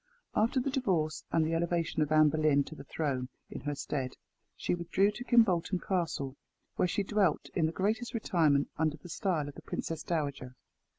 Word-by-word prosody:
After 230 +5 +2
the 265 +2 -1
divorce 175 - 0
and 165 -1 +3
the 160 - -1
elevation 170 -1 0
of 150 0 +1
Anne 155 -1 +6
Boleyn 155 -2 +3
to 155 - -10
the 145 - -9
throne 135 -4 -2 0.2
in - - -6
her 145 0 -2
stead, 135 -2 -3 0.4
she - - -1
withdrew 175 +4 +2
to 215 +4 -7
Kimbolten 200 -7 +3
Castle, 165 -9 -2 0.4
where - - +2
she 205 - 0
dwelt 195 -5 +1
in 160 -3 +2
the - - -2
greatest 220 +8 -1
retirement, 160 -10 +2
under 155 -1 +1
the 175 - -12
style 170 -7 -1
of 145 - -7
the - - -11
Princess 165 -1 -4
Dowager. 140 -6 -3
165 Hz, 185 wpm, -31 LUFS, 150-195 Hz, 0.4 s, Anne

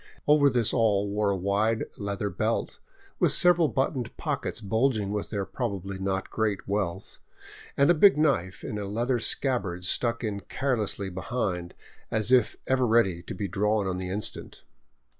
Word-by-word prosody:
Over 145 -1 +6
this 120 -4 +1
all 105 -4 +2
wore 105 0 +1
a 100 - +1
wide 105 +4 +1
leather 100 0 -3
belt, - - -2 0.4
with - - +4
several 175 -2 +4
buttoned 130 -3 -2
pockets - - -3
bulging 110 -1 0
with 105 -1 -3
their 100 -3 -2
probably 100 -5 -4
not 95 0 -2
great 105 -3 -1
wealth, 100 -4 -3 0.6
and 140 - +5
a - - +6
big 190 +1 +6
knife 120 - 0
in 105 - -4
a 100 - -4
leather 120 +5 -1
scabbard 100 -9 -1
stuck 115 +6 0
in 105 -3 -2
carelessly 105 -3 -2
behind, 90 -2 -3 0.3
as 110 +1 +1
if 125 -4 +4
ever 130 -1 +2
ready 100 -7 +3
to - - -7
be 100 +2 -3
drawn 105 +2 0
on 95 -1 -2
the 90 0 -4
instant. 100 +2 -3
105 Hz, 160 wpm, -27 LUFS, 100-125 Hz, 0.6 s, Over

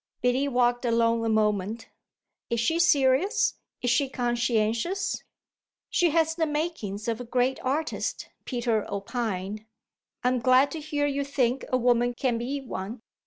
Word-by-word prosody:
Biddy 250 +3 +2
walked 245 -2 +2
along 230 -1 +2
a 225 - 0
moment. 215 0 0 0.6
"Is 235 -1 0
she 325 +9 +1
serious? 340 - +3 0.2
Is 245 - +2
she 270 +2 +2
conscientious?" 240 - 0 0.7
"She 350 - +3
has 320 0 +2
the 320 -1 0
makings 295 - -3
of 230 +1 -1
a - - -4
great 250 +2 0
artist," 295 +5 -2
Peter 235 -4 0
opined. 205 -1 -3 0.6
"I'm 250 0 +2
glad 255 +3 +4
to 320 - -4
hear 295 -1 -1
you 280 -1 0
think 265 -2 0
a 255 - +2
woman 245 0 +2
can 245 -2 0
be 265 +4 -2
one." 225 -2 -6
245 Hz, 145 wpm, -27 LUFS, 230-280 Hz, 0.7 s, glad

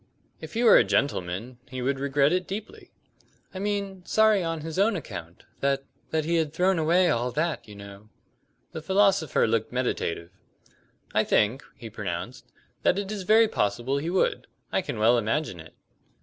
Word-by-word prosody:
"If - - -10
he 235 - +1
were 235 - +8
a - - +6
gentleman 105 +1 -1
he 130 +1 -7
would 135 +2 -1
regret 140 +2 +2
it 185 0 -1
deeply." 205 +3 -7 0.6
"I 185 - -6
mean 200 -2 -3
sorry 215 -1 +3
on 165 -1 -3
his 160 +3 -5
own 205 +2 +3
account; 85 - -8 0.2
that 135 0 0 0.3
that 155 -1 -1
he 170 +1 +1
had 155 -2 -1
thrown 185 0 +2
away 175 +3 +3
all 120 +1 0
that, 160 -3 -2
you 105 - -11
know?" 100 +1 -12 0.6
The 160 - -6
philosopher 190 -2 +2
looked 110 0 0
meditative. 95 -9 -2 0.8
"I - - +3
think," 115 +7 +1
he 115 - -9
pronounced, 105 +3 -6 0.3
"that - - +2
it 200 0 -3
is 210 -2 -4
very 225 +1 +6
possible 120 - -1
he 160 +4 -3
would. 185 +1 0 0.2
I - - +1
can - - -5
well 115 +3 +4
imagine 110 - -2
it." 80 0 -13
145 Hz, 175 wpm, -26 LUFS, 115-185 Hz, 0.8 s, were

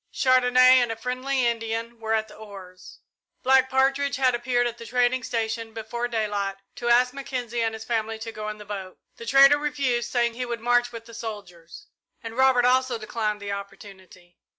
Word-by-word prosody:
Chandonnais 255 0 +5
and 240 -2 0
a - - -3
friendly 255 +3 -2
Indian 230 0 -3
were 225 0 0
at 220 0 -1
the - - -14
oars. 195 -4 -12 0.4
Black 265 0 +4
Partridge 270 +2 +1
had 260 -2 +2
appeared 245 0 0
at 240 0 -4
the 230 - -9
trading 250 +1 +1
station 225 -1 -3
before 230 +2 -4
daylight, 210 -4 -2 0.2
to 240 - -2
ask 250 +1 +4
Mackenzie 250 -4 -4
and 225 -1 -1
his 220 - -8
family 225 -1 -2
to 225 +1 -7
go 215 -1 -6
in 215 - -6
the 210 - -11
boat. 195 -2 -7 0.2
The 230 - -10
trader 275 +3 +6
refused, 270 -5 -1
saying 235 -1 +1
he 250 +2 -4
would 235 -1 -4
march 245 +1 +2
with 230 -1 -9
the 230 - -14
soldiers; 205 - -9 0.4
and 225 0 -7
Robert 260 -1 +4
also 255 -1 +2
declined 215 -1 -3
the 200 - -4
opportunity. 190 -3 -10
235 Hz, 190 wpm, -25 LUFS, 220-255 Hz, 0.4 s, trader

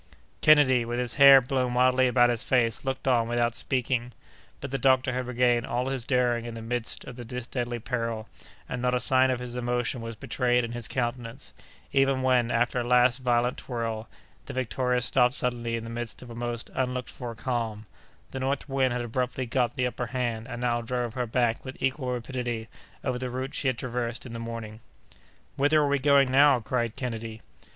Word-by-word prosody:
Kennedy, 140 -5 +6
with 120 +1 -3
his 125 -2 -1
hair 140 -1 +10
blown 125 -1 -1
wildly 130 +1 +4
about 120 -1 +4
his 120 -1 -2
face, 115 -4 +1
looked 135 0 -3
on 120 -3 +3
without 120 0 +1
speaking; 125 -1 -1 0.5
but 140 - -6
the 135 - -2
doctor 130 -1 +3
had 125 0 -3
regained 120 -1 +2
all 125 +2 -1
his 130 -3 -3
daring 125 -2 +1
in 120 -1 -6
the 115 - -7
midst 120 0 -1
of 125 - -9
this 125 0 -6
deadly 120 -2 -3
peril, 115 -2 -3 0.4
and 125 - -4
not 125 0 +1
a - - +1
sign 130 +2 +4
of 130 - +1
his 125 -1 -5
emotion 120 0 -1
was 115 0 -6
betrayed 125 +2 0
in 115 - -4
his 120 -1 -2
countenance, 120 0 -4 0.4
even 135 -1 +2
when, 125 -2 +3
after 120 +1 +1
a - - -1
last 125 +1 +4
violent 125 -1 +1
twirl, 115 -3 -4 0.4
the - - -6
Victoria 125 0 0
stopped 125 +1 +3
suddenly 120 -2 0
in 115 - -4
the - - -7
midst 120 +1 -5
of 120 - -11
a - - -8
most 120 0 -4
unlooked 125 -1 -2
for 120 -2 -7
calm; 115 -3 -3 0.5
the 135 - -5
north 135 +2 -2
wind 135 -2 +1
had 120 0 -1
abruptly 125 +2 -2
got 120 0 0
the 130 -2 0
upper 120 0 -3
hand, 120 -2 -3
and 120 - -6
now 120 -1 +1
drove 120 -1 -3
her 125 -1 -2
back 115 0 0
with 130 -1 -8
equal 130 -1 -1
rapidity 120 -2 -3 0.4
over 125 - -1
the 130 0 -3
route 130 +2 -4
she 140 - -1
had 130 -2 +1
traversed 120 -1 -3
in 120 - -8
the 115 - -5
morning. 115 -2 -6 0.8
"Whither 145 +3 +4
are 150 - +2
we 140 0 +1
going 140 -1 +4
now?" 140 -1 +6
cried 120 0 -2
Kennedy. 115 -3 -5
125 Hz, 200 wpm, -27 LUFS, 120-130 Hz, 0.8 s, hair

